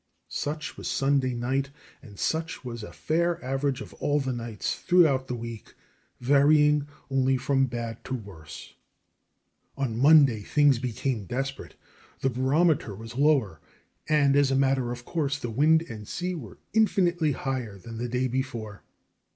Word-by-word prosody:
Such 150 +1 -4
was - - -6
Sunday 135 -2 +1
night, 135 +3 -1 0.3
and 105 -7 -14
such 160 -3 -2
was 120 -2 -6
a 105 - -8
fair 170 +2 0
average 135 0 -1
of - - -9
all 145 0 0
the 135 -2 -2
nights 115 -3 -4
throughout 155 -8 +3
the 125 - -3
week, 115 -2 -8 0.4
varying 145 +2 +4 0.2
only 135 0 +2
from 135 +1 +1
bad 120 -2 -5
to 130 - -3
worse. 95 -10 -10 1.0
On 130 -5 -2
Monday 140 -5 +6
things 145 +3 +3
became 125 -2 -2
desperate. 135 +7 -4 0.5
The 135 - +1
barometer 130 - +1
was 115 +3 -9
lower 130 - +2 0.5
and, 145 -2 +4
as 145 -1 +4
a 135 - +1
matter 135 -2 +1
of 120 0 -7
course, 145 -4 -1
the 120 -5 -5
wind 155 +7 +4
and 110 -9 -9
sea 180 +1 -3
were 130 - -8 0.2
infinitely 175 -8 +2
higher 125 -7 -4
than 115 +4 -9
the 120 0 -3
day 125 +2 0
before. 120 -5 -4
135 Hz, 150 wpm, -27 LUFS, 120-145 Hz, 1.0 s, Monday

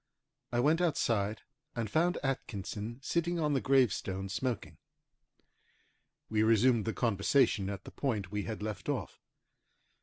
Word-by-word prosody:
I 120 - +1
went 155 +7 +3
outside, 110 - +1 0.3
and 115 -2 -1
found 170 - +2
Atkinson 115 -4 -3
sitting 170 +3 0
on 150 -2 +1
the 135 - +1
gravestone 100 -7 +1
smoking. 125 +4 -3 1.5
We 110 -1 +1
resumed 115 +1 +4
the 115 - -1
conversation 110 -1 +2
at 100 -2 -5
the - - -10
point 105 -9 -2
we 105 -1 -2
had 110 -2 -5
left 105 -5 -4
off. - - -3
115 Hz, 130 wpm, -32 LUFS, 100-135 Hz, 1.5 s, resumed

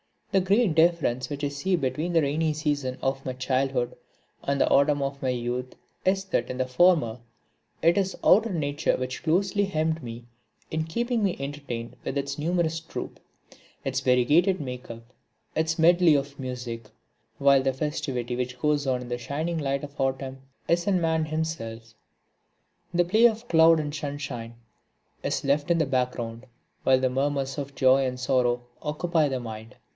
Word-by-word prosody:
The 195 - +4
great 195 0 +3
difference 160 -7 +2
which 145 0 -5
I 145 - +1
see 145 +7 0
between 155 +3 -2
the 165 - +5
Rainy 155 +2 +1
season 145 -4 -1
of 135 0 -1
my 130 - -2
childhood 130 -1 -1 0.5
and 140 0 -1
the - - +3
Autumn 140 +1 +4
of 140 0 -3
my 130 - 0
youth 125 +1 -3 0.3
is 190 +1 +2
that 185 -11 -1
in 125 - -4
the 130 - +1
former 130 -4 +3 0.6
it 170 +3 +4
is 190 -1 0
outer 220 +2 +5
Nature 145 -2 0
which 130 0 -4
closely 195 +5 +2
hemmed 160 -3 -1
me 115 0 -7 0.5
in 160 0 -1
keeping 235 +7 -1
me 195 -4 +1
entertained 140 -4 -5
with 140 - -2
its 140 +1 -3
numerous 165 0 0
troupe, 165 - -7 0.6
its 135 -1 -1
variegated 145 +9 +3
make 125 -2 -6
up, 115 0 -8 0.5
its 160 0 0
medley 170 -1 +5
of 140 0 -2
music; 125 -4 -5 0.5
while 140 -1 +5
the 135 0 0
festivity 130 -4 -3
which 125 0 -3
goes 145 +1 +1
on 125 -1 +1
in 125 - -8
the 120 - -2
shining 155 +7 -3
light 140 -1 -1
of 145 0 -9
autumn 135 0 -2 0.3
is 170 +2 +1
in 190 -3 +2
man 160 -1 +1
himself. 120 -8 -4 1.0
The 175 0 +3
play 215 +7 +4
of 230 +1 -4
cloud 165 -1 +6
and 145 -1 -4
sunshine 140 -6 -5 0.7
is - - -1
left 145 +3 +1
in 170 - +4
the 160 - +2
background, 125 -2 -2 0.4
while 130 -1 +4
the 130 0 +1
murmurs 135 +1 -1
of 140 0 -6
joy 130 0 +4
and 125 -1 -2
sorrow 125 -1 +1 0.2
occupy 155 +1 +1
the 130 -2 -2
mind. 110 0 -8
140 Hz, 170 wpm, -26 LUFS, 130-160 Hz, 1.0 s, cloud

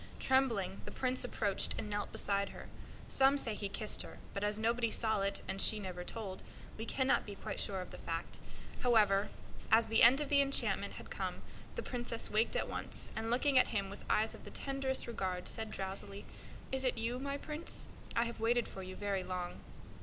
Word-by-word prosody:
Trembling, 230 -8 +1
the - - -7
Prince 255 0 0
approached 205 -5 0
and - - -3
knelt 205 0 -2
beside 200 0 +1
her. - - -10 0.4
Some 270 +1 +5
say 235 -5 0
he 205 -1 -4
kissed 210 +2 0
her; - - -8 0.2
but 200 - -3
as 210 0 +2
nobody 230 +1 +1
saw 220 -2 +3
it, 200 0 0
and 195 0 0
she 215 - +7
never 180 -3 -5
told, 195 -1 -5 0.3
we 220 +1 -6
cannot 260 -1 +2
be 205 - -8
quite - - -4
sure 190 -2 0
of 180 - -8
the - - -9
fact. 165 0 -3 0.4
However, 210 -5 +4 0.4
as 225 +1 +7
the 225 - +2
end 245 +4 +8
of 295 -2 -2
the 280 -1 +5
enchantment 275 0 +2
had - - -10
come, - - -4 0.3
the - - -3
Princess 240 -2 -3
waked 220 +2 +2
at - - 0
once, - - -2
and, 225 - -2
looking 260 +3 +4
at - - +5
him 200 -3 -2
with 200 - -9
eyes 220 +1 +2
of - - -12
the - - -8
tenderest 270 -1 0
regard, 185 -6 -3
said, 220 -1 -3
sleepily: 195 +1 -5 0.5
"Is 265 0 +1
it 255 -2 +1
you, 235 +2 -2
my 280 +1 -3
Prince? 305 +3 -3 0.3
I 230 - +3
have 235 - -5
waited 235 +1 +2
for 190 - -8
you 185 0 -7
very 200 -2 -1
long." 180 -1 -4
220 Hz, 205 wpm, -35 LUFS, 200-250 Hz, 0.5 s, end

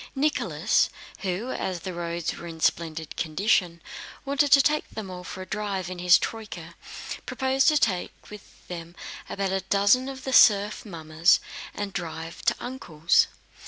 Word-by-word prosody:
Nicholas, 295 +3 +1 0.3
who, 195 +6 -3
as 180 -3 -3
the 185 0 -5
roads 170 -1 -3
were 170 - -8
in 165 -1 -8
splendid 160 -1 -1
condition, 175 0 +1 0.4
wanted 280 +1 +1
to 280 - +9
take 300 +2 +2
them 210 -4 -7
all 180 0 -7
for 185 +1 -7
a - - -10
drive 195 -2 -3
in 180 - -6
his 175 0 +7
troyka, 180 -7 -6 0.5
proposed 265 0 +1
to 305 - +5
take 190 -10 +1 0.2
with 210 -1 -14
them 170 -1 -7 0.3
about 195 -1 -2
a 190 0 0
dozen 205 +7 +3
of 265 -1 -8
the 265 - -3
serf 210 -2 +5
mummers 160 -1 +2 0.4
and 205 -1 -4
drive 165 -2 -5
to - - +2
"Uncle's." 170 -11 +1
190 Hz, 160 wpm, -26 LUFS, 170-225 Hz, 0.5 s, to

